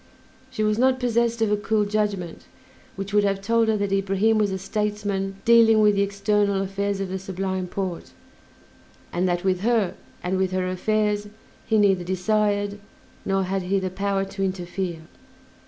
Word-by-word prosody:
She 215 - -2
was 215 +1 +1
not 260 0 +3
possessed 235 -2 +1
of 215 - +1
a - - +4
cool 210 0 +1
judgment, 205 -5 -2 0.5
which 195 +1 -6
would 205 0 +4
have 195 -1 +1
told 230 +3 +2
her 220 -1 +2
that 200 -1 -2
Ibrahim 195 +3 +2
was 210 -1 +2
a 190 - -2
statesman 200 -1 -2
dealing 230 -1 +6
with 210 -1 +5
the 200 - +1
external 200 0 +1
affairs 200 +1 -2
of 195 -1 -3
the 190 +1 -3
Sublime 190 -1 -3
Porte, 185 -2 -4 1.0
and 180 +1 +1
that 175 0 -1
with 185 -1 +1
her 220 -2 +1 0.3
and 185 +1 -1
with 190 -1 0
her 185 0 0
affairs 210 +2 0 0.4
he 220 - +3
neither 195 -3 +3
desired, 205 +2 0 0.5
nor 195 0 +1
had 190 +1 -1
he 185 +2 0
the 190 -1 -2
power, 195 +1 -1
to 195 0 -5
interfere. 185 -2 -3
200 Hz, 170 wpm, -24 LUFS, 190-210 Hz, 1.0 s, dealing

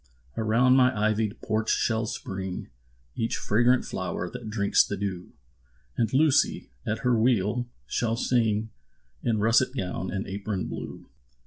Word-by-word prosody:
Around 115 +4 +3
my 130 -3 +4
ivy'd 110 0 0
porch 110 0 -1
shall 110 -1 +1
spring 95 -5 -5 0.5
Each 115 0 -1
fragrant 120 +4 +2
flower 90 -1 -4
that 110 - -7
drinks 100 -2 +3
the 100 - -4
dew; 95 -2 -4 0.6
And 115 -2 0
Lucy, 140 - +2 0.2
at 110 - -1
her 125 -1 +4
wheel, 115 0 +1 0.2
shall 115 -1 0
sing 110 -3 +1 0.5
In 115 -2 +1
russet 115 +5 +3
gown 95 -1 -3
and 100 +2 -3
apron 100 0 -3
blue. - - -7
110 Hz, 135 wpm, -27 LUFS, 100-120 Hz, 0.6 s, my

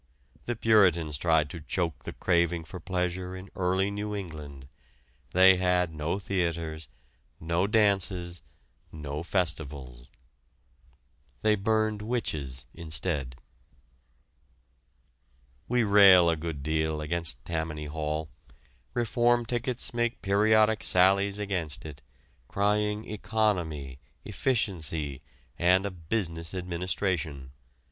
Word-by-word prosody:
The 120 - -2
Puritans 95 -9 +3
tried 80 +1 +2
to 85 - -7
choke 85 +1 -3
the - - -5
craving 85 -2 +1
for 90 +3 -9
pleasure 90 0 -2
in 95 +1 -10
early 95 +2 +1
New 105 +1 -3
England. 75 -8 -8 0.6
They 95 +1 +6
had 90 -2 +1
no 75 +4 -2
theaters, 85 -5 -2 0.5
no 85 +4 0
dances, 95 -5 +1 0.5
no 75 -1 -5
festivals. 75 -9 -3 1.3
They 110 0 +4
burned 110 +1 0
witches 75 - -3
instead. 80 -5 -2 2.3
We 125 0 +2
rail 100 -4 +7
a - - 0
good 80 -3 -5
deal 80 0 0
against 75 -5 -3
Tammany 80 -2 -3
Hall. 75 +1 -3 0.7
Reform 120 0 +2
tickets 120 +1 -2
make 120 0 -1
periodic 110 +2 +3
sallies 100 +2 +3
against 95 -8 -2
it, 75 -3 -9 0.5
crying 105 +3 0
economy, 90 - -1 0.3
efficiency, 80 - -1 0.4
and 90 +3 +4
a 100 - -2
business 85 -1 -3
administration. 85 -6 -3
90 Hz, 100 wpm, -28 LUFS, 80-100 Hz, 2.3 s, rail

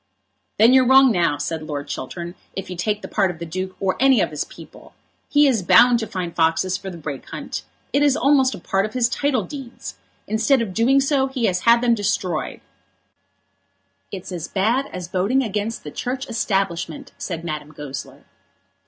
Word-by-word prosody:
"Then 225 +4 +6
you're 260 -1 +5
wrong 265 0 +7
now," 175 -7 +1
said 160 +1 -3
Lord 145 -2 -5
Chiltern, 170 +7 -6 0.2
"if 195 -1 -5
you - - -4
take 205 +4 -2
the - - -5
part 195 -3 +1
of 175 - -6
the 170 - -6
Duke 185 +3 -5
or 190 -1 +1
of - - -14
any 265 -3 +5
of - - +1
his 150 - -2
people. - - -14 0.3
He 295 0 +5
is 250 -7 +2
bound 235 +7 +6
to 220 - -4
find 180 -4 -5
foxes 165 +3 +2
for 190 +1 -6
the 175 - -8
Brake 145 -4 -7
hunt. - - -5 0.3
It 280 - +3
is 290 -1 +3
almost 270 -2 +3
a - - -9
part 195 +3 0
of 215 - -14
his 245 -2 +3
title 275 +2 0
deeds. 270 -5 -8 0.3
Instead 225 +5 +2
of 220 -5 -3
doing 245 +7 +3
so 270 -1 +2
he 260 -3 -2
has 180 -3 +1
had 235 0 +6
them 240 -1 +3
destroyed." 195 -6 -2 1.5
"It's 190 -1 -7
as 175 -3 -5
bad 230 +8 +1
as 180 -2 -6
voting 200 +9 +1
against 215 0 -3
the 150 - -7
Church 260 - -4
establishment," 195 -8 -2
said 170 -3 -5
Madame 155 -2 -5
Goesler. 145 -3 -8
200 Hz, 195 wpm, -22 LUFS, 175-250 Hz, 1.5 s, wrong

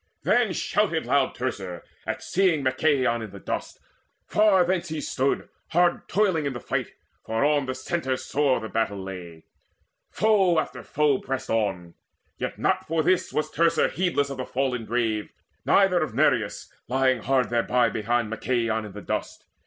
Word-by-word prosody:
Then - - +3
shouted - - 0
loud - - +2
Teucer, 90 -2 -4 0.2
at - - -3
seeing 180 -6 +2
Machaon 130 -3 +2
in 110 - -6
the 100 +1 -11
dust. - - -5 0.5
Far 205 -4 +4
thence 175 -1 -1
he 160 -1 -3
stood 135 -1 -1 0.2
hard 175 +1 +2
toiling 185 -7 +2
in 140 - -2
the 120 - -5
fight, - - -3 0.3
For 110 +5 0
on 145 -2 +2
the 130 - -2
centre 130 -1 -2
sore 140 -1 +1
the 110 - -6
battle 110 -1 -1
lay: 90 -4 -8 0.7
Foe 200 -6 +3
after - - -2
foe 145 -2 +1
pressed 135 -1 -4
on; 95 -6 -1 0.5
yet - - -3
not - - 0
for 160 0 +1
this 185 +3 +2
Was 155 - -1
Teucer 165 0 +2
heedless 165 -6 0
of 135 - -5
the 130 - -3
fallen 125 -3 -1
brave, 110 -2 -1 0.4
Neither 190 -3 +4
of 155 - -3
Nireus - - +1
lying 130 -1 +2
hard 130 -3 +1
thereby 120 0 +2
Behind 115 +1 0
Machaon 110 0 -1
in 105 - -9
the 105 - -8
dust. - - -4
130 Hz, 165 wpm, -25 LUFS, 115-160 Hz, 0.7 s, Far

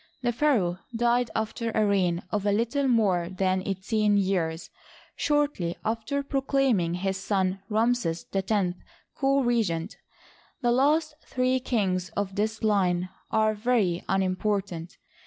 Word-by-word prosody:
The 240 - +2
pha 295 +4 +3
raoh 175 -2 -1 0.2
died 240 +1 +2
after 220 +1 -2
a 215 - +3
reign 185 -4 +1
of 205 -1 -1
a - - +3
little 235 +7 +1
more 195 -8 +2
than 185 0 0
eighteen 205 +2 +1
years» 180 -4 -1 0.4
shortly 290 - 0
after 225 +6 -1
proclaiming 270 - +1
his 190 +1 -2
son 195 -1 -1
Ramses 220 -6 0
X 195 +1 -1 0.6
co 275 0 +2
regent. 210 -8 0 0.7
The 240 - +3
last 300 +5 +2
three 255 0 0
kings 190 -8 -1
of 200 -1 -1
this 220 +3 -2
line 185 -4 +2 0.2
are 215 0 +2
very 210 -6 +1
unimportant. 190 -2 -1
210 Hz, 130 wpm, -27 LUFS, 185-240 Hz, 0.7 s, pha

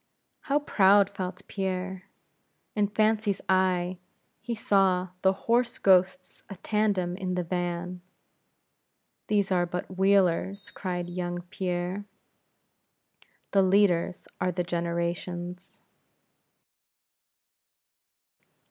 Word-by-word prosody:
How 285 -1 +1
proud 200 -8 +4
felt 190 -1 -6
Pierre: 190 -1 -3 0.7
In 210 -1 +2
fancy's 215 -1 +1
eye, 185 -1 +1 0.4
he 235 +1 -4
saw 190 -4 +2
the 190 - +4
horse 240 +1 +2
ghosts 185 -1 +2
a 195 - -6
tandem 200 -3 0
in 185 -1 -3
the 180 - -1
van; 175 +1 -3 1.3
"These 205 -2 +1
are 175 -1 +2
but 180 +2 -5
wheelers" 195 0 +2
cried 180 -2 -4
young 175 0 -4
Pierre 180 +2 -3 1.5
"the 195 - +4
leaders 185 -2 +2
are 180 - +1
the 180 0 -2
generations." 175 +1 -4
185 Hz, 95 wpm, -27 LUFS, 180-200 Hz, 1.5 s, proud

